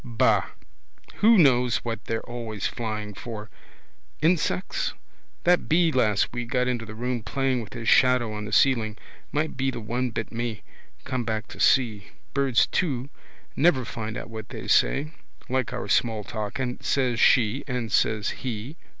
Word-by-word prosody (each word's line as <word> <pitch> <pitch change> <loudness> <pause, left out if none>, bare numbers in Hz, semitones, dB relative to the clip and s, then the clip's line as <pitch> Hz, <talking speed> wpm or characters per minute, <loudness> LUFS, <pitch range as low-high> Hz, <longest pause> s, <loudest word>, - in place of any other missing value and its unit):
Ba. 120 -4 +2 0.7
Who 225 +1 +6
knows 125 - +4
what 115 -2 -4
they're 115 0 -3
always 115 -4 -5
flying 110 -3 -3
for. 105 +1 -8 0.7
Insects? 155 - 0 0.5
That 180 0 +3
bee 165 +1 +4
last 110 -7 +2
week 120 -1 -4
got 125 -1 +1
into 120 -3 -2
the 110 - -8
room 120 +1 -2
playing 130 +4 0
with 105 -3 -10
his 115 -2 -6
shadow 125 -4 +4
on 105 0 -5
the 105 - -7
ceiling. 110 -3 +3 0.3
Might 155 +2 -1
be 135 +1 +1
the 130 - -4
one 120 +3 -2
bit 115 -1 -4
me, 115 -6 -4 0.4
come 130 -2 -2
back 110 -1 -2
to - - -11
see. 110 -6 +3 0.3
Birds 135 -4 +3
too. 140 -6 -1 0.4
Never 135 -5 +3
find 110 -1 -5
out. - - -6
Or - - -14
what 110 -1 -8
they - - -7
say. 150 +3 +3 0.4
Like 130 0 0
our 125 - -4
small 110 -3 +1
talk. 105 -1 -5
And 125 -2 -3
says 125 -4 +1
she 120 +1 +4
and 125 -4 -3
says 105 0 +2
he. 125 +5 -5
120 Hz, 165 wpm, -25 LUFS, 110-130 Hz, 0.7 s, Who